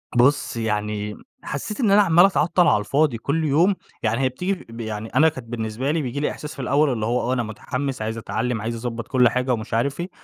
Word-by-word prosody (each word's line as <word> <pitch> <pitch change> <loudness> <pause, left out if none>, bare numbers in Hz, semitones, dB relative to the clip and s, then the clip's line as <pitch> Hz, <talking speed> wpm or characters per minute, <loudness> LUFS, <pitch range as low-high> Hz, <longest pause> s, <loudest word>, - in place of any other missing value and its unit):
بُص، 125 +1 +3
يعني 105 -1 -2 0.3
حسّيت 150 - -5
إن 225 -6 +3
أنا 205 +1 +7
عمّال 175 -2 +6
أتعطّل 175 -2 +3
على - - +4
الفاضي 140 +4 +1
كل 145 +7 -1
يوم، 165 +7 +3 0.3
يعني 115 +3 +1
هي 130 - +2
بتيجي 180 +10 -2 0.2
ب 115 +1 -10
يعني 110 0 -5
أنا 150 +7 +4
كانت 130 -6 -10
بالنسبة 115 +3 -2
لي 160 0 0
بييجي 130 0 -3
لي 150 - 0
إحساس 150 - -7
في - - -6
الأول 140 +3 +2
اللي 110 -3 -2
هو، 120 +2 +1
آه، - - +2
أنا 125 -2 0
مُتحمِّس 125 +4 -4
عايز 110 +1 -3
أتعلّم، 115 0 -2
عايز 115 +2 -4
أضبّط 115 -1 -4
كل 125 -2 +4
حاجة 125 +1 0
ومش 110 0 -5
عارف 135 +7 0
إيه. 175 +2 -3
125 Hz, 230 wpm, -23 LUFS, 115-150 Hz, 0.3 s, أنا